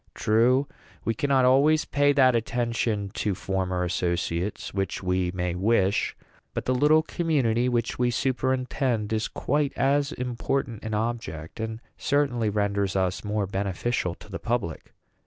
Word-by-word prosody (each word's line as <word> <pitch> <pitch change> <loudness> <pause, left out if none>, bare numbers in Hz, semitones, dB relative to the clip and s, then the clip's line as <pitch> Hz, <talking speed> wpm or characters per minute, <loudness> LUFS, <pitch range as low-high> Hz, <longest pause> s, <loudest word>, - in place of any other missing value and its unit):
True, 125 +6 +3 0.4
we 115 - +1
cannot 135 +2 +2
always 145 +5 +4
pay 145 0 +3
that 130 -3 +5
attention 115 -3 -1
to 105 -3 -1
former 95 -1 -1
associates 90 +1 -2
which 95 -1 -2
we 90 -1 +1
may 90 -1 -2
wish; 100 +1 +1 0.4
but - - -2
the 130 - +2
little 150 +5 +4
community 125 -9 +1
which 120 -1 -1
we 125 0 +3
superintend 125 -2 0
is 110 0 0
quite 145 0 -1
as 140 +1 +2
important 125 -2 -2
an 110 -1 -2
object, 110 -7 -4
and 110 0 -4 0.2
certainly 130 -6 +1
renders 100 -2 0
us 95 -1 0
more 105 -1 -1
beneficial 95 0 -2
to - - -15
the - - -4
public. 115 -9 -3
115 Hz, 140 wpm, -26 LUFS, 95-130 Hz, 0.4 s, that